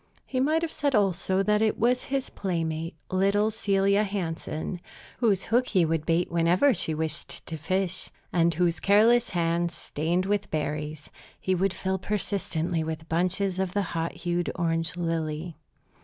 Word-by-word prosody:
He 260 Hz, -, -2 dB
might 310 Hz, +5 st, +2 dB
have 330 Hz, -, -2 dB
said, 285 Hz, -3 st, 0 dB
also, 190 Hz, -1 st, +2 dB
that 210 Hz, +1 st, +2 dB
it 220 Hz, -1 st, +2 dB
was 245 Hz, +3 st, +2 dB
his 270 Hz, -1 st, -2 dB
playmate, 165 Hz, -3 st, -2 dB, 0.2 s
little 200 Hz, +3 st, +2 dB
Celia 200 Hz, -1 st, +2 dB
Hansen, 175 Hz, -3 st, -4 dB, 0.4 s
whose 205 Hz, -6 st, +3 dB
hook 245 Hz, +2 st, +2 dB
he 185 Hz, -5 st, +3 dB
would 160 Hz, -1 st, -1 dB
bait 170 Hz, +1 st, +1 dB
whenever 170 Hz, +11 st, +4 dB
she 165 Hz, -5 st, 0 dB
wished 155 Hz, 0 st, -3 dB
to 165 Hz, -, -5 dB
fish, 185 Hz, +3 st, -1 dB, 0.2 s
and 170 Hz, -1 st, +4 dB
whose 170 Hz, +1 st, +1 dB
careless 225 Hz, +4 st, +4 dB
hands, 170 Hz, -1 st, 0 dB
stained 170 Hz, +5 st, -1 dB
with 205 Hz, +1 st, 0 dB
berries, 150 Hz, 0 st, -3 dB, 0.3 s
he 185 Hz, -, 0 dB
would 190 Hz, +1 st, +1 dB
fill 190 Hz, 0 st, -1 dB
persistently 180 Hz, -4 st, -2 dB
with 160 Hz, 0 st, -5 dB
bunches 185 Hz, +3 st, 0 dB
of 190 Hz, -1 st, -1 dB
the 205 Hz, -, +1 dB
hot 165 Hz, 0 st, -1 dB
hued 175 Hz, 0 st, -2 dB
orange 165 Hz, 0 st, -1 dB
lily. 165 Hz, -1 st, -2 dB
180 Hz, 155 wpm, -27 LUFS, 165-200 Hz, 0.4 s, whenever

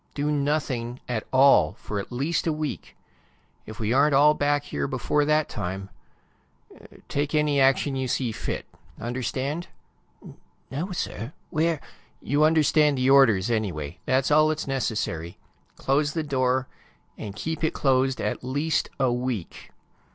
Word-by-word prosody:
Do 145 Hz, +1 st, 0 dB
nothing 140 Hz, -5 st, -1 dB
at 115 Hz, -3 st, -3 dB
all 130 Hz, -, +5 dB
for 105 Hz, 0 st, -5 dB
at 100 Hz, -, -7 dB
least 145 Hz, +7 st, -1 dB
a -, -, +3 dB
week. 155 Hz, -2 st, -5 dB, 0.7 s
If 110 Hz, -, -9 dB
we 110 Hz, +1 st, 0 dB
aren't 140 Hz, +2 st, +4 dB
all 150 Hz, +2 st, +6 dB
back 145 Hz, -1 st, +1 dB
here 70 Hz, -, -3 dB
before 150 Hz, 0 st, 0 dB
that 150 Hz, 0 st, +2 dB
time... 95 Hz, -1 st, -5 dB, 1.2 s
take 145 Hz, +2 st, -1 dB
any 150 Hz, -2 st, +2 dB
action 135 Hz, +1 st, +3 dB
you 130 Hz, -1 st, -2 dB
see 125 Hz, -1 st, -1 dB
fit. -, -, -4 dB, 0.3 s
Understand?" 130 Hz, +7 st, -3 dB, 0.6 s
"No -, -, -11 dB, 0.4 s
no, 165 Hz, +9 st, -3 dB
sir. 130 Hz, -, -4 dB, 0.2 s
Where 160 Hz, 0 st, +1 dB, 0.3 s
" -, -, -36 dB
"You 145 Hz, +2 st, +4 dB
understand 155 Hz, -2 st, +4 dB
the 130 Hz, +1 st, +3 dB
orders, 120 Hz, -6 st, +5 dB
anyway. 90 Hz, -9 st, -2 dB
That's 130 Hz, +2 st, +2 dB
all 155 Hz, +1 st, +6 dB
that's 155 Hz, 0 st, -1 dB
necessary. 105 Hz, -11 st, -2 dB, 0.4 s
Close 145 Hz, +2 st, 0 dB
the 160 Hz, -, -1 dB
door 130 Hz, -2 st, 0 dB, 0.5 s
and 100 Hz, -2 st, -7 dB
keep 160 Hz, +8 st, -4 dB
it 160 Hz, -, 0 dB
closed 130 Hz, -1 st, +2 dB
at -, -, -2 dB
least 145 Hz, +5 st, -1 dB
a 130 Hz, -2 st, +2 dB
week!" 125 Hz, -7 st, -4 dB
135 Hz, 150 wpm, -25 LUFS, 120-150 Hz, 1.2 s, all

